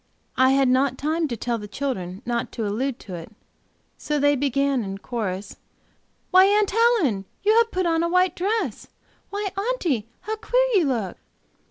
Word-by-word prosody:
I 260 +1 +4
had 270 -1 +3
not 260 +1 +2
time 315 +3 0
to 240 -4 -4
tell 235 +1 -2
the 210 - -8
children 205 -5 -4
not 235 -1 -2
to 225 - -3
allude 240 +5 -2
to 190 - -9
it, 170 +4 -8 0.7
so 300 - -1
they 290 +1 +4
began 275 -1 +1
in 195 -1 -5
chorus: 200 -3 -4 0.7
"Why, 375 +1 +7
Aunt 415 0 +3
Helen! 410 - +2 0.2
you 425 +2 +4
have 465 -1 +4
put 370 -3 -1
on 330 -1 +2
a 340 - 0
white 365 0 +2
dress!" 425 +5 -2 0.4
"Why, 405 0 -3
Aunty, 380 - -1
how 435 +1 -4
queer - - +2
you 375 -6 +4
look!" 230 -9 -2
280 Hz, 175 wpm, -24 LUFS, 235-380 Hz, 0.7 s, Why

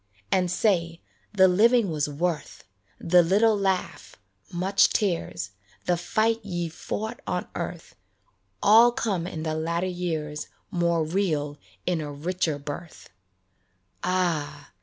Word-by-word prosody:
And 180 -1 +2
say, 170 -3 +1 0.2
" - - -39
The 190 0 +8
living 215 +2 +4
was 150 -2 -1
worth; 155 +1 -3 0.3
The 175 +1 +5
little 210 +6 +4
laugh, 190 - -2 0.4
much 185 +3 +3
tears, 165 - -1 0.3
The 175 - +2
fight 220 +6 0
ye 175 -4 -3
fought 215 +6 -5
on - - -2
earth, - - -6 0.7
All 230 +4 +7
come 200 -9 -1
in 160 -4 -5
the 155 -1 -1
latter 170 +3 -1
years 160 -5 -3 0.2
More 170 -3 +1
real 155 -4 -1 0.3
in 175 -3 0
a 150 -1 -5
richer 160 +1 -1
birth." 145 +3 -8 0.9
Ah 170 - -1
175 Hz, 125 wpm, -26 LUFS, 155-190 Hz, 0.9 s, The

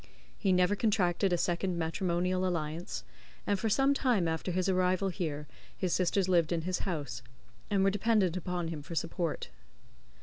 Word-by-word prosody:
He 195 - +1
never 180 +2 +3
contracted 195 -3 +2
a 175 - +3
second 175 +1 0
matrimonial 180 +2 0
alliance, 160 - -2 0.4
and 200 -1 +1
for 220 - 0
some 270 +6 +4
time 245 -11 +2
after 160 +3 -2
his 185 +1 0
arrival 185 +1 +2
here 155 -5 -3 0.3
his 185 -3 0
sisters 185 +1 +2
lived 170 -3 +3
in 170 -1 +1
his 180 +1 -1
house, 140 -8 -4 0.5
and 200 -2 +2
were 195 - +4
dependent 205 -3 +2
upon 180 -2 -2
him 160 -3 -5
for 165 +4 -8
support. 165 0 -2
180 Hz, 165 wpm, -31 LUFS, 170-195 Hz, 0.5 s, some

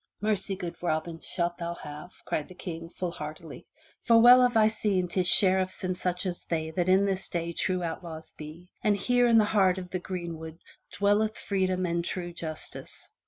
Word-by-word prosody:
"Mercy, 205 -2 0
good 175 -3 -6
Robin, 165 -1 -2
shalt 175 0 -3
thou 170 0 -4
have," 150 +2 -9 0.2
cried 150 - -2
the 185 - -13
King, 165 -2 -7
full 180 0 -4
heartily. 155 0 -8 0.3
"For 230 -1 +5
well 245 +2 +8
have 245 -2 +3
I 215 - +6
seen 210 -4 0
'tis 180 +1 0
sheriffs 185 0 +4
and 185 0 -1
such 180 +1 -2
as 180 -2 -3
they 160 -1 -3
that 175 +2 -1
in 190 +2 +5
this 195 -1 -2
day 170 -1 -3
true 185 +1 -1
outlaws 165 -1 -6
be, 155 +4 -11
and 210 -3 +3
here 245 +2 +2
in 230 -1 +5
the 215 - +5
heart 195 -3 +3
of 180 -1 -7
the 185 - -2
green 175 -3 -5
wood 160 0 -9 0.3
dwelleth 210 +2 +1
freedom 185 -2 -1
and 170 0 -1
true 175 0 -4
justice. 160 -2 -8
180 Hz, 195 wpm, -28 LUFS, 170-195 Hz, 0.3 s, well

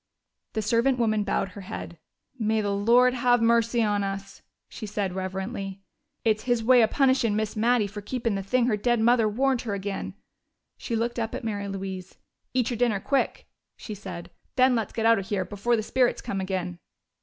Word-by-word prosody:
The 220 - -1
servant 235 +5 +2
woman 215 -3 +1
bowed 195 - -1
her 200 +2 -10
head. 185 -4 -7 0.4
"May 220 0 +1
the 205 -1 -1
Lord 240 +5 +4
have 245 -1 +3
mercy 230 0 +3
on 205 -1 +1
us!" 195 0 -5 0.3
she 215 - -8
said 200 -2 -2
reverently. 190 +1 -4 0.4
"It's 220 0 +1
His 240 -2 +1
way 250 +1 +6
of 220 - +4
punishin' 260 -6 +2
Miss 215 0 -1
Mattie 230 0 +3
fer 205 +1 -7
keepin' 230 +1 -2
the 195 - -1
thing 240 +5 +1
her 240 -3 +2
dead 240 +2 +1
mother 230 -1 +4
warned 260 +3 +1
her 215 -4 -3
agin'." 195 0 -4 0.6
She 235 - -4
looked 235 +1 -1
up 225 -1 -2
at - - -5
Mary 205 -3 -3
Louise. 190 -1 -6 0.3
"Eat 250 -1 0
your 240 - -2
dinner 230 -4 +2
quick," 275 +7 -1 0.3
she 215 - -7
said. 180 -4 -8 0.2
"Then 255 0 +5
let's 225 -4 -1
get 225 - -2
out 230 -1 +5
of 195 - -6
here, 195 -3 -1
before 210 +5 0
the 220 - -1
spirits 250 +2 +1
come 195 -1 -3
agin!" 185 -2 -3
220 Hz, 195 wpm, -26 LUFS, 195-240 Hz, 0.6 s, way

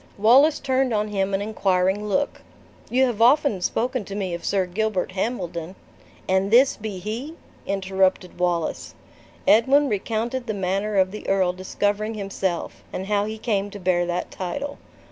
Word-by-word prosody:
Wallace 260 +9 +5
turned 260 -3 +1
on 210 0 0
him 195 -1 -1
an 195 - -1
inquiring 195 -1 +1
look. 280 +8 -1 0.5
"You 260 +2 +3
have 235 -4 -2
often 260 -4 +4
spoken 245 +5 -1
to 200 - -7
me 190 -3 -2
of 170 - -5
Sir 195 -2 +1
Gilbert 190 0 -1
Hambledon 185 -4 -3 0.3
" - - -26
"And 190 +1 +2
this 250 +5 +5
be 210 -3 -6
he!" 225 - -5 0.3
interrupted 190 -2 0
Wallace. 175 -2 -1 0.5
Edwin 270 +6 +5
recounted 230 +4 -2
the 220 - -2
manner 195 +2 -1
of 185 -1 +3
the 210 - -6
earl 190 -2 +2
discovering 205 +4 -2
himself, 195 -3 -3
and 190 - -4
how 205 0 +1
he 215 +1 -5
came 205 -3 -1
to 205 - -9
bear 175 -1 +1
that 175 0 -3
title. 280 +11 -5
205 Hz, 165 wpm, -23 LUFS, 190-230 Hz, 0.5 s, Wallace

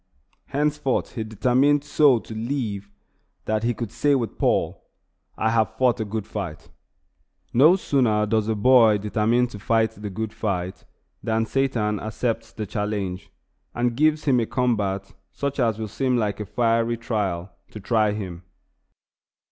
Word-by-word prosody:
Henceforth 150 -1 -1
he 115 - -3
determined 130 +6 +2
so 145 -3 +4
to 110 - -8
live 110 -4 -3 0.6
that 110 0 0
he 120 +1 0
could 115 -2 -5
say 140 +5 +2
with 120 -4 -3
Paul, - - 0 0.5
"I 110 +1 +1
have 110 -3 +1
fought 125 -4 +2
a 110 - -1
good 105 0 -4
fight." 95 -9 -6 0.8
No 150 +9 +6
sooner 120 - +1
does 110 0 0
a 110 - 0
boy 115 -1 +5
determine 110 +4 +1
to 105 - -9
fight 110 +2 +2
the 105 +1 -7
good 110 +3 -4
fight 95 -3 -3 0.4
than 110 0 0
Satan 115 -5 0
accepts 115 +2 -3
the 110 - -5
challenge, 100 -2 -3 0.5
and 120 0 0
gives 155 +3 +2
him 130 -4 +4
a 115 - -1
combat 100 -6 -1 0.2
such 140 0 -3
as 115 -4 +2
will 110 -1 -4
seem 125 +4 0
like 105 -3 -1
a 105 - -5
"fiery 115 +1 +1
trial" 100 -6 -2 0.2
to 105 - -9
try 110 +1 +2
him. 95 -5 -5
110 Hz, 155 wpm, -24 LUFS, 105-125 Hz, 0.8 s, No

